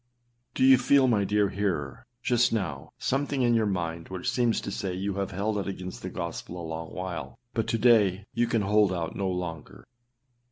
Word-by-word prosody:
Do 130 - +1
you 130 -1 +7
feel, 135 +1 +4
my 105 -5 +2
dear 105 0 +2
hearer, 85 -10 -3 0.2
just 120 -1 +3
now, 85 -12 -3
something 140 0 0
in 120 -1 +3
your 110 -2 +3
mind 85 -4 -3
which 95 -1 -2
seems 120 -3 +2
to - - -5
say 95 -2 -3
you 100 +2 -2
have 100 0 -2
held 105 +2 -1
out 100 - -3
against 95 -1 -6
the 95 - -5
gospel 85 0 -5
a 85 - -6
long 80 0 -5
while, 90 -3 -5 0.2
but 115 - -1
to 115 - +1
day 105 -5 +4
you 120 +1 +1
can 115 -3 +1
hold 105 0 +3
out 85 -3 -3
no 95 -1 -1
longer? 80 -9 -5
100 Hz, 200 wpm, -27 LUFS, 90-115 Hz, 0.2 s, you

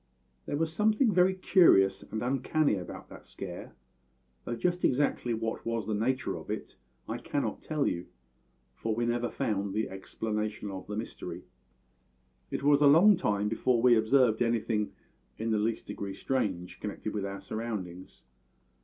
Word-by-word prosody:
"There 145 - -1
was 160 +1 -1
something 215 +4 +3
very 185 +1 +4
curious 95 - +5
and 110 +1 -5
uncanny 135 +3 +1
about 95 -3 -6
that - - -12
scare, - - -8 0.7
though - - -2
just 175 +8 -1
exactly 125 -3 +1
what 110 0 -3
was 115 -2 -2
the 110 - -2
nature 125 +5 0
of - - -11
it - - -5 0.3
I - - -3
cannot - - -2
tell 150 -2 -1
you, 85 0 -2 0.7
for 110 - -2
we 120 +1 0
never 120 0 0
found 100 -2 -2
the 110 -2 -1
explanation 105 +1 -4
of 95 -1 -7
the 105 0 -4
mystery. 110 - -6 1.1
It - - -3
was 145 0 +5
a 145 - +7
long 175 +9 +7
time 105 - 0
before 115 +3 +1
we 120 0 +6
observed 115 +1 +3
anything 115 -2 0 0.5
in 115 +1 -2
the 110 - +2
least 110 +2 -1
degree 100 -1 -5
strange 95 -10 -2
connected - - -5
with 105 - -2
our 100 0 -4
surroundings. 100 -6 -6
115 Hz, 160 wpm, -30 LUFS, 105-140 Hz, 1.1 s, a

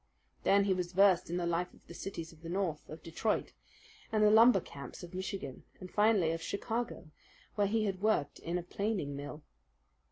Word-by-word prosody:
Then 200 0 +4
he 195 -1 +2
was 180 -1 -3
versed 190 -2 +5
in 175 - -1
the 175 - -1
life 170 +1 -1
of - - -23
the - - -11
cities 170 -2 -6
of 160 - -19
the 165 - -7
North, 175 -4 -2
of 155 +1 -9
Detroit, 170 +6 -1 0.6
and 215 -1 +3
the 210 - +6
lumber 225 -1 +7
camps 140 -2 -9
of 175 +1 -9
Michigan, 185 -7 -5 0.2
and 185 - -9
finally 205 -6 +4
of 165 0 -3
Chicago, 225 -4 -3 0.4
where 205 -1 +2
he 215 +1 +1
had 195 -2 -2
worked 215 -9 +1
in 170 +2 -2
a 175 - -3
planing 185 -6 -2
mill. 145 +2 -7
185 Hz, 195 wpm, -33 LUFS, 165-205 Hz, 0.6 s, lumber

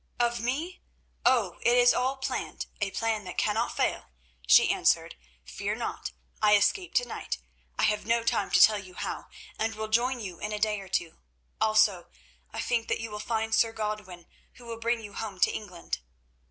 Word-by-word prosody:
"'Of 240 0 +1
me? 285 +10 -3 0.5
Oh! 220 -9 +2
it 240 +1 +4
is 245 0 +6
all 260 +2 0
planned, 265 - -3 0.2
a 200 - +1
plan 220 +1 -1
that 180 - -7
cannot 220 +3 0
fail,' - - 0 0.4
she - - +7
answered. - - +2 0.3
'Fear - - -3
not; - - -4 0.3
I 210 -1 +6
escape 360 - +1
to - - +4
night—I - - -6
have 210 0 +1
no 230 0 +2
time 230 - +1
to - - +4
tell 215 -1 +7
you 185 -2 -12
how—and 225 +4 -5
will 220 0 -4
join 245 +3 +2
you 185 -6 -7
in 210 0 -4
a - - -1
day 210 0 +1
or 195 - -10
two. 170 -3 -2 0.4
Also, 215 -4 +3 0.4
I - - -4
think 235 -2 0
that - - 0
you 225 -1 -5
will 210 - -5
find 225 0 -2
Sir 225 0 +3
Godwin, 210 -5 -5 0.3
who 245 - -15
will 230 -1 -6
bring 230 0 0
you 205 -1 -9
home 205 -4 -5
to - - +5
England. 180 - -5
220 Hz, 185 wpm, -28 LUFS, 210-235 Hz, 0.5 s, she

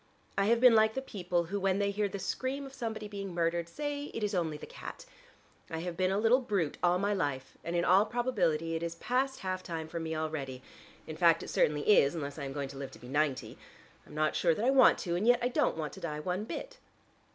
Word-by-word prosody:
I 195 - +2
have 230 +2 +3
been 250 -1 +7
like 220 0 +4
the 265 - -1
people 180 -7 -1
who 195 +4 -3
when 190 0 +1
they 200 0 +1
hear 205 0 0
the 200 - -5
scream 260 +8 -3
of 270 - -10
somebody 225 -4 -4
being 195 -3 -6
murdered 170 0 0
say 290 - -4
it 225 - -3
is 210 0 0
only 165 -5 -1
the - - -9
cat. - - -9 0.6
I 160 - -4
have 175 0 -4
been 185 +1 +1
a 195 - +1
little 225 +4 +4
brute 200 - -1
all 175 0 +3
my 200 +2 +1
life, 140 -8 -2
and 170 - -3
in 175 - +2
all 195 +4 +5
probability 180 -10 0
it 165 - -2
is 170 0 -3
past 265 +8 -1
half 185 -1 -2
time 165 -3 -5
for 170 +1 -5
me 160 0 -3
already; 145 -5 -4 0.4
in 155 -1 -7
fact 165 -2 +4
it - - -7
certainly 150 -1 +1
is 175 -7 +5
unless 145 -1 -5
I 140 - -4
am 135 - -5
going 140 -1 -3
to 135 0 -9
live 140 - -5
to - - -12
be 125 - -12
ninety. 145 -1 -1 0.5
I'm 150 - -12
not 155 0 +1
sure 170 -2 +3
that 215 - -1
I 260 - +5
want 265 -2 +6
to, 170 -2 -2
and 195 +6 0
yet 245 0 +6
I 245 0 0
don't 245 - +1
want 155 -2 -4
to - - -9
die 150 -3 -4
one 180 +6 -2
bit." - - -7
180 Hz, 255 wpm, -31 LUFS, 160-215 Hz, 0.6 s, been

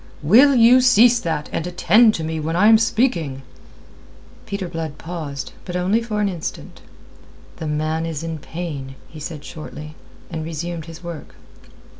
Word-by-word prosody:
"Will 255 - +6
you 245 +2 +6
cease 245 -1 +5
that, 160 -6 -3
and 165 - -3
attend 215 +5 +4
to 160 - -4
me 160 0 -3
when 160 +2 -2
I 205 +5 +5
am 220 -1 +7
speaking?" 175 - 0 1.0
Peter 200 -2 -4
Blood 165 -3 -5
paused, 155 -5 -6
but 180 - -6
only 190 +6 +1
for 220 -2 -3
an 205 - +2
instant. 175 -5 -6 0.8
"The 160 - -5
man 155 +2 -1
is 160 -1 -4
in 165 -1 -4
pain," 145 -5 -6
he 155 - -12
said 150 -1 -7
shortly, 155 0 -9 0.4
and 160 - -4
resumed 165 +1 -5
his 165 +1 -11
work. 170 -3 -8
165 Hz, 160 wpm, -21 LUFS, 155-210 Hz, 1.0 s, am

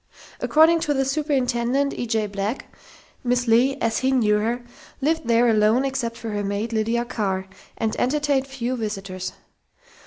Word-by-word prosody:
According 320 +2 +5
to 295 -2 0
the 270 0 +1
superintendent, 270 -2 0
E. 240 - -4
J. 220 -1 0
Black, 205 +4 -4 0.5
Miss 245 0 +1
Leigh, 250 +4 +4
as 225 -1 0
he 260 +1 +1
knew 215 -5 +3
her, 235 +3 -1 0.4
lived 315 0 0
there 235 +1 +4
alone 220 +3 +3
except 245 -4 -2
for 225 -1 -5
her 205 0 -2
maid, 205 +3 -2
Lydia 230 +2 0
Carr, 195 -6 -2 0.3
and 220 -1 -1
entertained 280 0 +1
few 255 -2 -3
visitors. 195 -5 -4
235 Hz, 155 wpm, -23 LUFS, 215-270 Hz, 0.5 s, According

